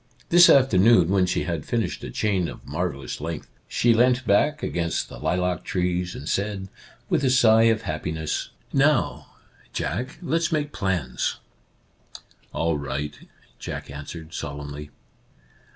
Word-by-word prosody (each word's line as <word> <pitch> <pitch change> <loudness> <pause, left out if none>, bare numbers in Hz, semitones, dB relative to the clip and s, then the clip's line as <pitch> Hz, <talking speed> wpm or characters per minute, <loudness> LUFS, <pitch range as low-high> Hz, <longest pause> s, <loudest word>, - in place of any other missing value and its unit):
This 175 0 +8
afternoon, 115 -8 +5
when 95 -1 +3
she - - 0
had 85 -4 -3
finished 115 -7 -2
a - - -5
chain 95 -5 0
of - - -10
marvellous 70 -5 -4
length, 80 0 -5 0.2
she 120 -1 +3
leant 125 +2 +3
back 150 +10 +2
against 85 -1 -1
the - - -10
lilac 90 -1 -1
trees 90 -1 -1
and 75 - -8
said, 100 0 -2 0.4
with - - +1
a 130 - +3
sigh 115 -3 +5
of 115 0 +2
happiness: 80 0 -3
" - - -32 0.2
Now, 150 -5 -2 0.4
Jack, 130 +5 -3
let's 165 0 0
make 150 -2 -1
plans! 90 - -1 0.4
" - - -38
" - - -17
All 80 -2 0
right," 70 +1 -4 0.5
Jack - - -6
answered, 80 +3 -8
solemnly. 75 0 -6
90 Hz, 145 wpm, -24 LUFS, 80-115 Hz, 0.5 s, This